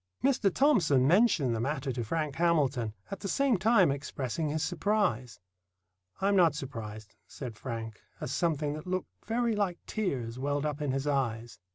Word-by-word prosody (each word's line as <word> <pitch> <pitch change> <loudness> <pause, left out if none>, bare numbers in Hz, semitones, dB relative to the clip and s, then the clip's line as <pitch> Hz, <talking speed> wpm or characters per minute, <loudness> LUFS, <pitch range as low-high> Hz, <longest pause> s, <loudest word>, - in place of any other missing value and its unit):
Mr. 255 -7 +3
Thomson 170 - +4
mentioned 170 - +4
the - - -2
matter 135 +2 -1
to 120 -1 -3
Frank 150 +5 -2
Hamilton, 140 -10 +1 0.2
at 195 - -4
the 200 - -5
same 275 +3 +2
time 195 -4 +4
expressing 140 +2 -3
his 155 +1 -1
surprise. 175 - 0 0.8
"I'm 200 +1 +2
not 170 -6 +5
surprised," 110 -6 -7
said 125 -5 -7
Frank, 115 -2 -6 0.2
as - - -4
something 150 -2 0
that 155 +4 -7
looked 185 0 -2 0.2
very 230 0 +1
like 195 -4 0
tears 130 - -3
welled 145 +2 -1
up 150 0 -2
in 145 - -1
his 135 +1 -1
eyes. 120 -5 -1
150 Hz, 165 wpm, -30 LUFS, 130-185 Hz, 0.8 s, not